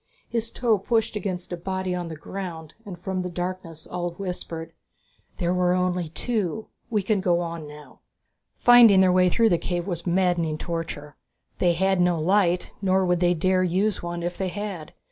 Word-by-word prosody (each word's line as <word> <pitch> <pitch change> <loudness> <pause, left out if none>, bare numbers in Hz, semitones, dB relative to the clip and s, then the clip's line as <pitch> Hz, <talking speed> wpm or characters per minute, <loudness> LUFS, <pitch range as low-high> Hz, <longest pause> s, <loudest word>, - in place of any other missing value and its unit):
His 230 -1 -2
toe 230 -4 +1
pushed 225 +2 0
against 185 -3 -4
a - - 0
body 185 +1 -3
on 175 -1 -3
the 160 - -6
ground 165 -1 -7
and 185 -3 -7
from 185 +1 -3
the 180 - -4
darkness 175 -2 -5
Ulv 175 -1 -3
whispered, 165 -4 -6 0.6
"There 175 -1 0
were 180 -1 +2
only 180 -2 0
two. 220 +2 -2 0.2
We 210 -4 0
can 200 0 +1
go 175 -2 +2
on 165 -3 -5
now." 150 -2 -13 0.6
Finding 235 -5 +7
their 185 -1 +5
way 180 0 +4
through 225 +5 +3
the 175 -4 +2
cave 175 -1 -3
was 175 -2 -4
a - - +2
maddening 175 -3 +1
torture. 165 -3 -5 0.4
They 175 -1 +3
had 190 +1 +2
no 175 -2 +2
light, 180 +1 +2
nor 190 -1 +2
would 180 -1 +2
they 175 0 +3
dare 185 +3 +2
use 185 +3 +1
one 175 0 -4
if 175 +1 -4
they 190 -1 -1
had. 195 -5 -6
180 Hz, 185 wpm, -25 LUFS, 170-190 Hz, 0.6 s, Finding